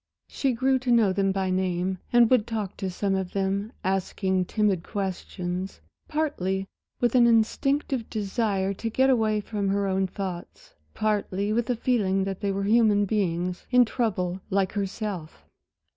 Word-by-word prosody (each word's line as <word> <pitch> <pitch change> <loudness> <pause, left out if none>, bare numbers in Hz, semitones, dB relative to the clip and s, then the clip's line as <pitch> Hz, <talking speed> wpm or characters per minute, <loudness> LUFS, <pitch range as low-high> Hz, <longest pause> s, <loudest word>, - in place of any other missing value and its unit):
She 270 -2 -1
grew 260 +2 +2
to 255 0 -4
know 225 -5 +4
them 195 0 +1
by 190 -1 -1
name, 185 0 -1
and 240 -1 +6
would 240 -3 +4
talk 215 -4 -3
to 190 - -3
some 195 +2 -1
of 190 -2 -2
them, 200 +2 -1
asking 190 0 0
timid 205 -3 +1
questions, 185 -1 -4 0.3
partly 195 - -1 0.3
with 240 -2 +2
an 245 -2 +6
instinctive 235 +2 +1
desire 200 -2 -1
to 225 +4 -4
get 265 +4 +3
away 215 -4 +2
from 205 -2 -2
her 200 +1 +1
own 190 0 +1
thoughts, 185 -2 -7 0.2
partly 205 -1 0
with 230 0 0
the 245 - +1
feeling 205 -6 +1
that 195 -1 -4
they 200 - 0
were 195 0 -2
human 210 -1 +4
beings, 180 -3 -1
in 250 -1 +6
trouble 190 -6 -1
like 195 -2 +1
herself. 200 -4 -4
200 Hz, 160 wpm, -26 LUFS, 190-225 Hz, 0.3 s, and